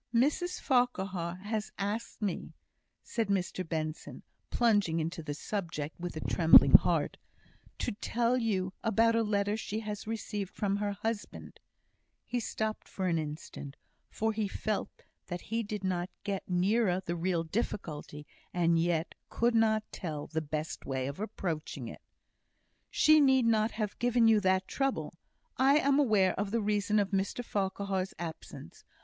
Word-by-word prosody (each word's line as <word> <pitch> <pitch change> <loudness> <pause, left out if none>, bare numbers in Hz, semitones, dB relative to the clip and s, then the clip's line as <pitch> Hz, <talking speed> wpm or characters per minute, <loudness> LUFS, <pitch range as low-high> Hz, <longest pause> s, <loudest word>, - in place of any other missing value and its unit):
"Mrs 300 +9 +2
Farquhar 195 - 0
has 215 0 -3
asked 210 +3 -3
me," 195 -4 -3 0.5
said 230 -3 -2
Mr 185 -2 -1
Benson, 155 -2 -4 0.3
plunging 205 -9 +2
into 165 +2 -3
the 145 -2 -5
subject 165 -5 -4
with 175 -2 -5
a - - -4
trembling 165 -1 +7
heart, - - +5 0.6
"to - - -2
tell 235 +3 0
you 195 -6 0
about 230 +1 +3
a 230 - +3
letter 205 -1 +1
she 220 0 -4
has 210 -1 -5
received 210 -3 -4
from 200 -1 0
her 205 0 -1
husband;" 210 +1 -5 0.7
he 245 - -1
stopped 220 -1 -3
for 190 - -4
an 170 -3 +2
instant, 150 -2 -6 0.3
for 220 0 -1
he 215 -1 -1
felt 210 +1 -3 0.2
that 175 -1 -4
he 225 +2 -2
did 210 -2 -5
not 180 -1 -1
get 195 -2 -3
nearer 185 +1 +2
the 170 - -2
real 170 -1 0
difficulty, 160 -5 -4 0.3
and 170 -1 +2
yet 170 -1 0 0.2
could 235 +1 +1
not 220 -1 +3
tell 155 -5 -5
the 160 0 -2
best 155 +1 -4
way 130 -1 -2
of 140 +5 -5
approaching 160 - -4
it. - - -9 0.9
"She 310 0 +5
need 265 -3 +5
not 220 -1 +3
have 215 -2 -3
given 240 -1 +4
you 220 -1 +6
that 190 -1 +2
trouble. 270 -1 -1 0.4
I 275 +2 +5
am 280 -1 +3
aware 210 -9 +4
of 200 0 -1
the 230 +3 0
reason 210 0 +1
of 205 -1 +1
Mr 200 +5 -1
Farquhar's 195 -2 -2
absence. 165 -2 -8
200 Hz, 155 wpm, -31 LUFS, 175-225 Hz, 0.9 s, trembling